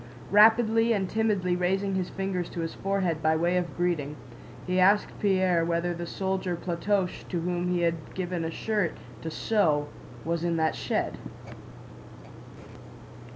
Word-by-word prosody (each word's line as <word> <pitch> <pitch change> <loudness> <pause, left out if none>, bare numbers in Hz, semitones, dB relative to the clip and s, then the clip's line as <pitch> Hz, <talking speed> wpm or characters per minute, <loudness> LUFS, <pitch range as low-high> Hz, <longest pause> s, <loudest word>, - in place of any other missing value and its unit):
Rapidly 225 +2 +5
and 195 -3 0
timidly 200 -4 +1
raising 190 +2 0
his 185 -1 -1
fingers 190 -3 -3
to 170 - -5
his 165 - -3
forehead 190 -5 -1
by 160 +1 +3
way 170 +3 +1
of 175 -6 -2
greeting, 165 -5 -1 0.5
he 185 0 0
asked 200 +3 +4
Pierre 185 -4 +2
whether 170 +1 0
the 170 0 -5
soldier 190 -1 -2
Platoche 180 +2 -1
to 175 -3 -2
whom 175 +1 -1
he 180 -1 +1
had 165 -2 -2
given 180 -2 -2
a 160 - -2
shirt 210 0 -1 0.3
to 160 - -4
sew 155 -6 +1 0.4
was 170 0 -1
in 170 -1 0
that 160 -1 +2
shed. - - -2
180 Hz, 150 wpm, -27 LUFS, 170-195 Hz, 0.5 s, Rapidly